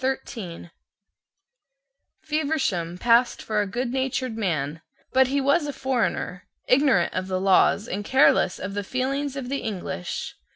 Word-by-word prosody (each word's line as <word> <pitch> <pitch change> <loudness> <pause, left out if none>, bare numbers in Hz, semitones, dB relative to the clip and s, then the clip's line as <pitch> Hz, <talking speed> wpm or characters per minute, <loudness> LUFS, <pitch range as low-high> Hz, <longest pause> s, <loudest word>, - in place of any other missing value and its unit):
Feversham 280 - -1
passed 235 +4 +3
for 215 -1 -1
a 205 - -2
goodnatured 255 +2 -2
man: 160 -7 -2 0.3
but 260 0 +5
he 280 +2 0
was 280 +3 +2
a - - -2
foreigner, 245 -9 -2 0.2
ignorant 255 -10 +3
of 185 0 -2
the 185 -1 -1
laws 195 +3 +3
and 205 -1 -3
careless 265 -4 +4
of 185 +2 -5
the 205 0 -2
feelings 270 +5 -2
of 270 -3 -5
the 275 +2 -2
English. 185 - -4
240 Hz, 130 wpm, -25 LUFS, 190-270 Hz, 0.3 s, but